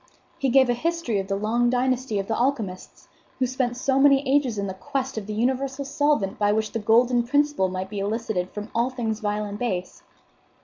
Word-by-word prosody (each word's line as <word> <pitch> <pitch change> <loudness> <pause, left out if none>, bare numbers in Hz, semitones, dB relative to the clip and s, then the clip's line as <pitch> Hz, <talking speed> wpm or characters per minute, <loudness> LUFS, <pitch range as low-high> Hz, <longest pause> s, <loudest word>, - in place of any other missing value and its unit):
He 270 - +1
gave 260 +1 +5
a 245 - +2
history 320 -5 -1
of 195 - -4
the 195 - -1
long 230 +4 +1
dynasty 255 -2 0
of 195 0 -2
the 225 - 0
alchemists, 230 -8 -2 0.3
who 260 - +1
spent 245 -1 -1
so 265 +1 +1
many 275 0 +5
ages 265 -5 +2
in 200 0 -2
quest 265 +3 -3
of 215 -2 -5
the 215 - -4
universal 265 +4 -1
solvent 285 -8 0
by 205 -1 +3
which 215 0 -1
the 225 - -2
golden 240 +3 +3
principle 285 -5 +1
might 185 +1 -5
be 205 - -4
elicited 205 -3 -2
from 210 +1 -7
all 235 +2 +1
things 225 -4 -3
vile 210 -1 -1
and 205 0 -6
base. 185 -7 -3
240 Hz, 205 wpm, -24 LUFS, 210-265 Hz, 0.3 s, gave